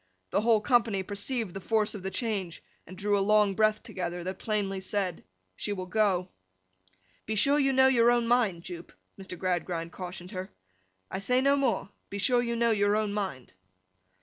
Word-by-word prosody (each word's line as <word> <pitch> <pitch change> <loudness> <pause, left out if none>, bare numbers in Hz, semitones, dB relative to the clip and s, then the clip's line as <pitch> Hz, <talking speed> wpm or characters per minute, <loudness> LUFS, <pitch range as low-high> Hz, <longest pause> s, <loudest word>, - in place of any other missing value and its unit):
The - - +2
whole 225 -1 +4
company 225 -4 +2
perceived 205 +1 -3
the 195 - -6
force 215 +2 +1
of 205 - -7
the 190 - -3
change, 195 -6 -3 0.2
and 185 - -11
drew 205 +1 +1
a 200 - +2
long 210 0 +4
breath 215 +1 +2
together, 175 -1 -4
that 185 +1 -5
plainly 200 -3 -1
said, 190 -2 -2 0.3
'she 205 - -3
will 185 -2 -5
go!' 185 -2 +1 1.0
'Be 220 - -1
sure 280 +7 +4
you 275 -1 +3
know 265 0 +5
your 240 -3 +5
own 240 -1 +2
mind, 220 -8 +2
Jupe,' 175 -1 -8 0.3
Mr. 190 -1 -7
Gradgrind 175 -2 -2
cautioned 180 0 -8
her; 185 -2 -5 0.6
'I - - -3
say 250 +6 +2
no 275 +2 +4
more. 245 -8 0 0.2
Be 200 - -5
sure 245 +4 +3
you 235 -1 -2
know 235 0 +2
your 205 -1 +2
own 215 -1 0
mind! 190 - -4
205 Hz, 185 wpm, -28 LUFS, 185-230 Hz, 1.0 s, know